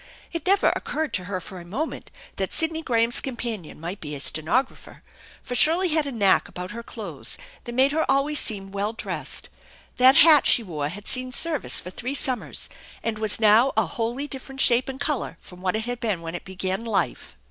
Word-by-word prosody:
It 335 +2 -5
never 395 +1 +4
occurred 310 -1 -3
to 185 - -2
her 185 0 -3
for 185 +1 -9
a - - -10
moment 255 - -5 0.3
that - - -3
Sidney 320 -1 +2
Gra 235 -7 +1
ham's 235 +2 +4
companion 235 - -5
might 175 +5 -6
be 150 -2 -5
a - - -6
stenographer, 170 - -2 0.4
for 250 - -6
Shirley 335 +8 +3
had 310 -2 +1
a - - -3
knack 205 -6 +3
about 180 +2 -7
her 235 +2 -6
clothes - - -5 0.3
that 240 - -6
made 265 +2 +4
her 315 +2 +1
always 275 +2 +3
seem 195 -3 -1
well 200 +2 -2
dressed. 230 - -3 0.5
That 260 +2 +7
hat 310 -3 +8
she 235 - +5
wore 150 -7 -4
had 205 +5 -8
seen 255 0 +3
service 315 +1 +3
for 180 - -8
three 250 +8 -4
sum 255 -3 0
mers, - - -4 0.4
and 225 -2 -2
was 215 -1 +2
now 225 +5 +5
a 220 - +4
wholly 235 - -3
different 270 -1 -9
shape 250 0 +3
and 265 0 -6
color 285 - -2
from 180 0 -14
what 185 0 -1
it 220 0 -2
had 245 0 -4
been 210 -8 -2
when 165 0 -6
it 175 - -7
began 190 +2 -3
life. 230 - -2
235 Hz, 210 wpm, -24 LUFS, 195-275 Hz, 0.5 s, hat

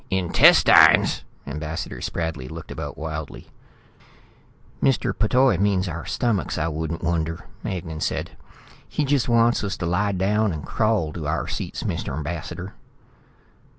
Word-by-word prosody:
"Intestines?" 95 -3 +6 0.2
Ambassador 75 +3 -5
Spradley 80 -6 -3
looked 80 +1 -9
about - - -6
wildly. 80 -1 -6 1.3
"Mr. 135 -2 +2
P'Toi 125 -2 +3
means 100 -2 +1
our 85 0 -5
stomachs, 115 -6 -1
I 80 +1 0
wouldn't 80 +1 -4
wonder," 80 -1 -1 0.2
Magnan 80 -4 -5
said. - - -2 0.6
"He 150 - -1
just 135 -3 +1
wants 115 0 +3
us 100 -3 -3
to 90 - -3
lie 100 +4 +1
down 100 +3 +1
and 75 -2 -6
crawl 110 -9 0
to 80 -4 -5
our 75 +1 -1
seats, - - -4
Mr. 70 - -3
Ambassador." 85 +4 -5
85 Hz, 130 wpm, -23 LUFS, 80-105 Hz, 1.3 s, Intestines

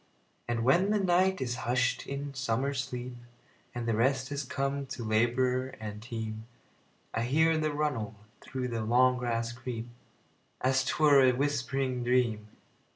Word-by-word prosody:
And 115 -1 -1
when 175 - +4
the 215 - +3
night 185 -1 +2
is 120 -2 -2
hush'd 125 -1 0
in 140 0 -4
summer 130 +1 -1
sleep, 125 -2 -4 0.6
And 120 -1 -3
rest 130 +4 +1
has 145 0 -2
come 140 +1 -2
to 130 -2 -6
laborer 125 +4 +1
and 105 -1 -6
team,I 110 0 -8
hear 160 +7 +3
the 155 -1 0
runnel 145 -8 -2 0.3
through 130 -1 -4
the 115 -1 -2
long 125 +3 +3
grass 115 -1 -1
creep, 120 -2 -6 0.7
As 130 +1 +2
't - - -1
were 145 -3 +7
a 130 -1 +5
whispering 135 -1 -1
dream. 120 -4 +1
125 Hz, 145 wpm, -30 LUFS, 120-140 Hz, 0.7 s, were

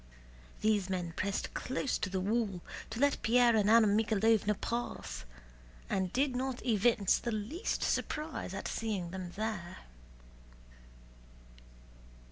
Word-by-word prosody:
These 210 -3 +2
men 180 -3 -2
pressed 200 0 -2
close 260 +1 -2
to 185 - -2
the 190 0 -1
wall 200 -2 0 0.3
to 225 +1 -5
let 285 +1 +2
Pierre 240 0 +5
and 210 -1 +3
Anna 230 0 +7
Mikháylovna 215 0 +2
pass 65 - -4 0.7
and 190 -2 0
did 265 0 +1
not 255 0 -3
evince 220 -3 +3
the 235 - -3
least 225 - -2
surprise 300 - -2
at 195 - -4
seeing 200 -6 -2
them 185 -1 -5
there. 195 -4 -3
215 Hz, 120 wpm, -32 LUFS, 190-240 Hz, 0.7 s, Anna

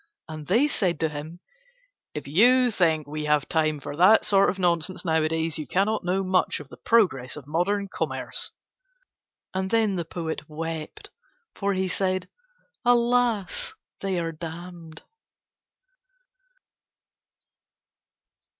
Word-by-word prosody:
And 155 -2 -8
they 235 +10 +4
said 180 - 0
to 160 - +2
him: 155 +4 -8 0.7
"If 150 - -5
you 245 - +5
think 160 -6 +2
we 150 +1 -5
have 150 -1 +2
time 155 -2 +1
for 145 0 -7
that 190 +6 +6
sort 195 -1 +4
of 190 - -2
nonsense 175 0 0
nowadays 160 0 0
you 150 - -5
cannot 200 - +1
know 185 +2 0
much 185 -1 +1
of 145 -2 -11
the - - -12
progress 175 - +2
of 150 -3 -9
modern 185 +7 0
commerce." - - -3 1.0
And 190 0 -1
then 220 -3 +2
the 170 - -1
poet 160 -2 -5
wept 160 0 -6 0.4
for 200 0 -1
he 190 0 0
said: 185 0 -1 0.6
"Alas! 240 -4 +2 0.2
They 195 -2 -2
are 165 -1 -2
damned." 165 0 -9
175 Hz, 125 wpm, -25 LUFS, 155-195 Hz, 1.0 s, that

